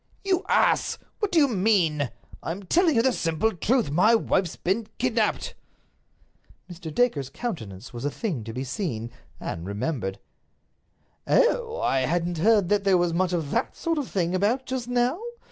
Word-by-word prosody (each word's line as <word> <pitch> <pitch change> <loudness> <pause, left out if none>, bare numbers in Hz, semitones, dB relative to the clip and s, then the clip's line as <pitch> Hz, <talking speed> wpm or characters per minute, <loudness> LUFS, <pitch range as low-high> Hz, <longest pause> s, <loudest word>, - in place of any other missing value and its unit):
"You 380 -2 +1
ass! - - +3 0.2
What 415 -3 -1
do 345 - +1
you 295 -3 +6
mean? 185 - +2 0.3
I - - -5
am 185 +5 -4
telling 330 - +3
you 230 - +4
the 260 0 +3
simple 165 +5 0
truth. 215 - +1
My 185 +9 +5
wife's 185 -6 0
been 205 +5 -1
kidnaped." 230 -3 0 1.1
Mr. 175 -3 -8
Dacre's 150 - +1
countenance 135 - -6
was 120 +1 -6
a 145 - +1
thing 155 - -3
to 115 - -5
be 125 +3 -4
seen—and 120 - -5
remembered. 100 -2 -3 1.1
"Oh! 485 -1 +2
I 135 - +2
hadn't 170 +5 0
heard 205 -1 +4
that 205 -1 +2
there 195 -2 +4
was 175 -1 +1
much 185 +1 +1
of 165 -5 -2
that 235 - -1
sort 330 -2 -1
of 280 - -4
thing 175 -2 0
about 215 +8 +1
just 255 -2 -3
now. 245 +6 +1
185 Hz, 165 wpm, -25 LUFS, 150-240 Hz, 1.1 s, you